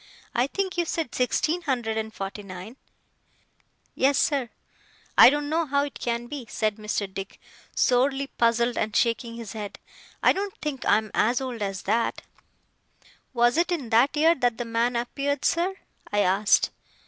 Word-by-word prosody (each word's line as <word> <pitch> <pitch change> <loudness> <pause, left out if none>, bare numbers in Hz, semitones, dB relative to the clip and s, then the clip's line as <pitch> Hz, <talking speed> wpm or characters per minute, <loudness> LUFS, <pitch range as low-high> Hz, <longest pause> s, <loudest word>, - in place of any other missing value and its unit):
I 245 +2 +2
think 380 +3 -2
you 345 - +2
said 320 -5 -3
sixteen 305 +7 0
hundred 245 -8 -1
and 220 0 -3
forty 195 0 -6
nine?' 190 +3 -9 1.2
'Yes, 275 +1 +2
sir.' 275 -5 +1 0.7
'I - - +10
don't 290 +1 -1
know 320 +2 0
how 280 +1 +2
it 285 - -6
can 235 0 -2
be,' 260 -1 -7
said 215 -1 -1
Mr. 210 -1 -2
Dick, 195 0 -8 0.4
sorely 270 +2 +2
puzzled 235 -2 +1
and 215 -1 -2
shaking 230 0 +1
his 230 -3 -7
head. 210 -2 -6 0.5
'I - - +6
don't 395 0 -4
think 295 -4 -4
I - - +6
am 215 -1 -4
as 240 +3 +2
old 255 -4 -5
as 195 -2 -3
that.' 225 +3 0 1.1
'Was 240 +4 +3
it 345 +1 +2
in 285 -10 -3
that 245 +6 +4
year 320 +2 +5
that 245 -6 0
the 240 - -3
man 230 +2 0
appeared, 275 +4 -2
sir?' 355 +3 +1 0.4
I 205 0 +2
asked. 200 +2 +3
240 Hz, 170 wpm, -25 LUFS, 220-285 Hz, 1.2 s, I